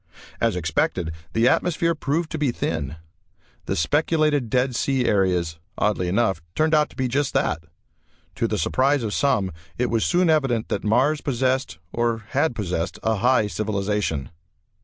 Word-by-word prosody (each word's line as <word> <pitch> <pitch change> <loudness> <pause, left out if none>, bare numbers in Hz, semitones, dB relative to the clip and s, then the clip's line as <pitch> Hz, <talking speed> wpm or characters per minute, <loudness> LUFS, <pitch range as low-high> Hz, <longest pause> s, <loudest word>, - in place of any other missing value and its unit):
As - - +1
expected 85 -3 0 0.2
the 115 +2 +3
atmosphere 170 +2 +2
proved 155 +2 -2
to 160 - -3
be 145 -4 +2
thin. 80 - -3 0.7
The - - 0
speculated 150 - +1
dead 125 +1 +1
sea 130 0 +1
areas, 90 -5 +1 0.2
oddly 100 -4 +1
enough, 95 -2 +1
turned 155 +1 +2
out 150 -1 +4
to - - -18
be 130 -2 0
just 135 +2 -1
that. 80 +2 0 0.7
To - - 0
the - - -1
surprise 135 - +2
of 105 -2 -2
some, 120 -10 +1 0.3
it 125 0 0
was 115 -2 +2
soon 180 0 +2
evident 135 -8 +1
that - - -2
Mars 130 +8 +2
possessed, 130 - 0 0.2
or 115 -2 -1
had 140 -1 +1
possessed, 90 -5 -2
a 110 -1 +1
high 125 +1 +3
civilization. 105 -7 -2
120 Hz, 160 wpm, -23 LUFS, 100-145 Hz, 0.7 s, out